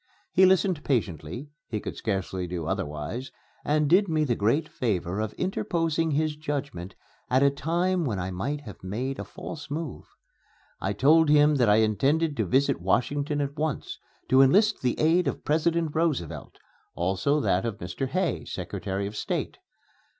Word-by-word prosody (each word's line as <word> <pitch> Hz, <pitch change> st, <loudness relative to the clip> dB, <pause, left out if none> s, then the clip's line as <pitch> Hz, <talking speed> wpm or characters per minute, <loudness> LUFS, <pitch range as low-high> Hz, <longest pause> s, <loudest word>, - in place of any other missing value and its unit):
He 190 Hz, -, +6 dB
listened 185 Hz, -4 st, +2 dB
patiently 115 Hz, -, -2 dB, 0.2 s
he 110 Hz, -, -3 dB
could -, -, -6 dB
scarcely 95 Hz, -3 st, -2 dB
do 85 Hz, -2 st, -4 dB
otherwise 95 Hz, -, -4 dB, 0.3 s
and 150 Hz, 0 st, +2 dB
did 190 Hz, +6 st, +4 dB
me 155 Hz, -1 st, +2 dB
the 130 Hz, -5 st, +1 dB
great 130 Hz, +10 st, +1 dB
favor 95 Hz, -, -2 dB
of 110 Hz, -1 st, -2 dB
interposing 165 Hz, -4 st, -1 dB
his 155 Hz, +1 st, 0 dB
judgment 140 Hz, -, -4 dB, 0.3 s
at 130 Hz, +2 st, +3 dB
a 140 Hz, -, +5 dB
time 175 Hz, +5 st, 0 dB
when 115 Hz, -9 st, -1 dB
I 90 Hz, +1 st, -3 dB
might 140 Hz, +11 st, -3 dB
have 105 Hz, -9 st, -11 dB
made 120 Hz, +8 st, -3 dB
a -, -, -3 dB
false 145 Hz, -, -8 dB
move. 155 Hz, 0 st, -5 dB, 0.7 s
I 95 Hz, -, -1 dB
told 150 Hz, +8 st, +5 dB
him 150 Hz, 0 st, +6 dB
that 120 Hz, -4 st, +3 dB
I 105 Hz, -, +6 dB
intended 135 Hz, -, +2 dB
to 110 Hz, -4 st, 0 dB
visit 130 Hz, -5 st, +2 dB
Washington 145 Hz, -, 0 dB
at 140 Hz, 0 st, -3 dB
once, 155 Hz, -3 st, -3 dB, 0.3 s
to 130 Hz, +1 st, +6 dB
enlist 205 Hz, +11 st, +4 dB
the 125 Hz, -2 st, 0 dB
aid 165 Hz, +3 st, +3 dB
of -, -, -3 dB
President 160 Hz, +1 st, +1 dB
Roosevelt; 155 Hz, -, -2 dB, 0.4 s
also 95 Hz, -, +1 dB
that 95 Hz, -9 st, +1 dB
of 115 Hz, -3 st, -3 dB
Mr. 90 Hz, +10 st, -4 dB
Hay, 175 Hz, 0 st, -1 dB
Secretary 100 Hz, +1 st, -4 dB
of 105 Hz, +2 st, -6 dB
State. -, -, -3 dB
140 Hz, 165 wpm, -27 LUFS, 100-155 Hz, 0.7 s, He